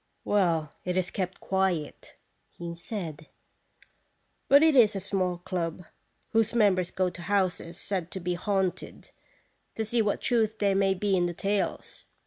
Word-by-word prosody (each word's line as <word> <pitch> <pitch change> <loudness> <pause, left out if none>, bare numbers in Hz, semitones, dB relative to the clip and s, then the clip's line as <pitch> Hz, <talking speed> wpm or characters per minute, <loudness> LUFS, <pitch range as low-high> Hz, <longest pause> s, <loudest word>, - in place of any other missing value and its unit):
" - - -46
Well, 165 -7 +1
it 180 0 -2
is 185 -1 0
kept 185 -1 -3
quiet," 190 -6 -2 0.3
he 170 -1 -7
said; 170 -4 -6 1.2
"but 280 +3 +7
it 320 -2 +5
is 220 -5 +6
a - - -1
small 185 -2 -1
club, 175 -1 -4 0.5
whose 225 +1 +2
members 190 -6 +3
go 185 -1 0
to 175 - -10
houses 180 -3 -1
said 185 -4 -3
to 190 - -6
be 180 0 -2
haunted, 190 0 -2 0.6
to 220 - -2
see 230 +2 +1
what 210 -2 0
truth 220 -2 +1
there 200 -2 +2
may 195 0 +2
be 195 +1 +1
in 175 -1 +2
the 175 - -5
tales. 200 +2 -2
190 Hz, 160 wpm, -28 LUFS, 175-205 Hz, 1.2 s, but